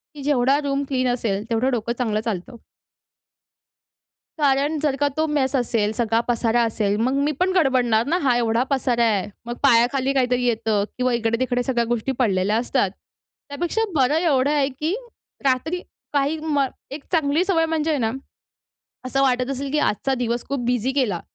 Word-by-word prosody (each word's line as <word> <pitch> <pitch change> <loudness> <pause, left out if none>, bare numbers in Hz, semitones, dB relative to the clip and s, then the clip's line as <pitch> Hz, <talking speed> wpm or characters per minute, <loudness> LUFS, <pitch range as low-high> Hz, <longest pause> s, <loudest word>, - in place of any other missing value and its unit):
की 285 - -8
जेवढा 275 0 +2
room 280 0 -1
clean 255 -2 0
असेल 210 -5 -2
तेवढं 230 +3 +1
डोकं 235 -1 -1
चांगलं 220 -4 0
चालतं. 205 -1 -4 1.8
कारण 285 +2 +2
जर 290 -2 0
का 290 - +3
तो 315 0 +1
मेस 285 -2 0
असेल, 230 -4 +1
सगळा 225 0 +1
पसारा 235 0 +1
असेल, 215 -3 0
मग 245 +4 +1
मी 295 - +1
पण 370 +1 +2
गडबडणार 250 -8 +3
ना 335 +4 +2
हा 255 -3 +3
एवढा 230 0 +1
पसारा 250 -4 +1
आहे. 210 -5 +1 0.2
मग 240 0 -4
पायाखाली 260 +1 +3
काहीतरी 250 -2 +1
येतं 220 -3 +1
किंवा 250 0 +1
इकडे-तिकडे 240 +2 0
सगळ्या 240 -2 0
गोष्टी 240 +2 -1
पडलेल्या 205 -3 +2
असतात. 240 -4 0 0.6
त्यापेक्षा 345 +9 -2
बरं 270 +1 +3
एवढं 290 -5 +2
आहे 285 -2 +2
की 300 +6 -3 0.5
रात्री 285 +7 0 0.3
काही 285 +2 +1
म 305 -3 0 0.3
एक 280 +1 -7
चांगली 315 -1 +2
सवय 335 -4 +2
म्हणजे 320 -1 -1
आहे 295 - 0
ना, 225 -2 0 1.0
असं 270 +2 0
वाटत 255 -1 +1
असेल 275 +1 -4
की 300 - +1
आजचा 270 0 0
दिवस 235 +1 -2
खूप 280 -1 -2
बिझी 245 0 +1
गेला 240 -11 0
255 Hz, 170 wpm, -22 LUFS, 235-285 Hz, 1.8 s, का